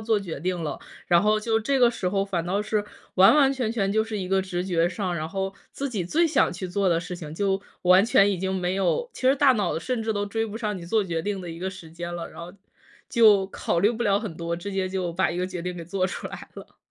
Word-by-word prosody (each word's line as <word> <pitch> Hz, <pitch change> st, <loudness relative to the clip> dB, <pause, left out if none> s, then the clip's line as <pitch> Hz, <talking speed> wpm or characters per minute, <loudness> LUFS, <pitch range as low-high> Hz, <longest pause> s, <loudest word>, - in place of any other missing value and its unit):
做 220 Hz, -1 st, +1 dB
决 175 Hz, -7 st, -6 dB
定 180 Hz, +2 st, -2 dB
了， 150 Hz, -, -4 dB, 0.3 s
然 170 Hz, -1 st, +5 dB
后 215 Hz, +1 st, +2 dB
就 220 Hz, +1 st, +1 dB
这 270 Hz, +5 st, 0 dB
个 245 Hz, -2 st, +5 dB
时 230 Hz, -6 st, -2 dB
候 195 Hz, +1 st, 0 dB
反 180 Hz, -4 st, -2 dB
倒 200 Hz, +4 st, 0 dB
是 210 Hz, -1 st, -1 dB, 0.3 s
完 190 Hz, +6 st, +7 dB
完 275 Hz, -2 st, +5 dB
全 250 Hz, -5 st, -2 dB
全 200 Hz, -4 st, 0 dB
就 220 Hz, +2 st, +2 dB
是 225 Hz, -1 st, -5 dB
一 185 Hz, -3 st, -4 dB
个 195 Hz, 0 st, +2 dB
直 180 Hz, -1 st, -3 dB
觉 175 Hz, -2 st, +1 dB
上， 185 Hz, 0 st, -3 dB
然 155 Hz, -1 st, -3 dB
后 195 Hz, +2 st, -3 dB, 0.2 s
自 280 Hz, -, -3 dB
己 200 Hz, -8 st, -2 dB
最 325 Hz, -, +2 dB
想 310 Hz, -, +2 dB
去 180 Hz, +1 st, -5 dB
做 195 Hz, +1 st, +1 dB
的 165 Hz, -1 st, +2 dB
事 180 Hz, +1 st, -6 dB
情 155 Hz, -3 st, -8 dB
就 195 Hz, +2 st, 0 dB, 0.2 s
完 185 Hz, +3 st, +6 dB
全 205 Hz, -3 st, +4 dB
已 190 Hz, -, -1 dB
经 190 Hz, +1 st, -2 dB
没 180 Hz, 0 st, -1 dB
有 195 Hz, -, 0 dB
其 -, -, -11 dB
实 260 Hz, +1 st, +5 dB
大 280 Hz, -1 st, +5 dB
脑 205 Hz, -9 st, 0 dB
甚 250 Hz, +8 st, -2 dB
至 220 Hz, -, 0 dB
都 205 Hz, 0 st, -1 dB
追 225 Hz, +2 st, -2 dB
不 215 Hz, 0 st, -7 dB
上 210 Hz, -3 st, -2 dB
你 170 Hz, -, -9 dB
做 220 Hz, +4 st, +2 dB
决 170 Hz, -4 st, -2 dB
定 200 Hz, +3 st, -3 dB
的 175 Hz, -2 st, -7 dB
一 165 Hz, -, -8 dB
个 185 Hz, +2 st, -3 dB
时 185 Hz, -4 st, -10 dB
间 170 Hz, +1 st, -6 dB
了， 170 Hz, -1 st, -6 dB
然 -, -, -11 dB
后 170 Hz, +1 st, -8 dB, 0.6 s
就 215 Hz, -5 st, +5 dB
考 170 Hz, -, -1 dB
虑 205 Hz, -, +4 dB
不 235 Hz, 0 st, -3 dB
了 200 Hz, 0 st, +3 dB
很 200 Hz, -8 st, -6 dB
多， 170 Hz, 0 st, -3 dB
直 175 Hz, +4 st, -6 dB
接 190 Hz, -1 st, -1 dB
就 185 Hz, -2 st, -2 dB
把 170 Hz, -2 st, +1 dB
一 175 Hz, -, -5 dB
个 180 Hz, -, 0 dB
决 180 Hz, -2 st, -5 dB
定 180 Hz, +1 st, -4 dB
给 170 Hz, -, -7 dB
做 185 Hz, +2 st, -1 dB
出 180 Hz, -, -5 dB
来 -, -, -9 dB
了。 -, -, -12 dB
190 Hz, 300 characters per minute, -25 LUFS, 175-215 Hz, 0.6 s, 完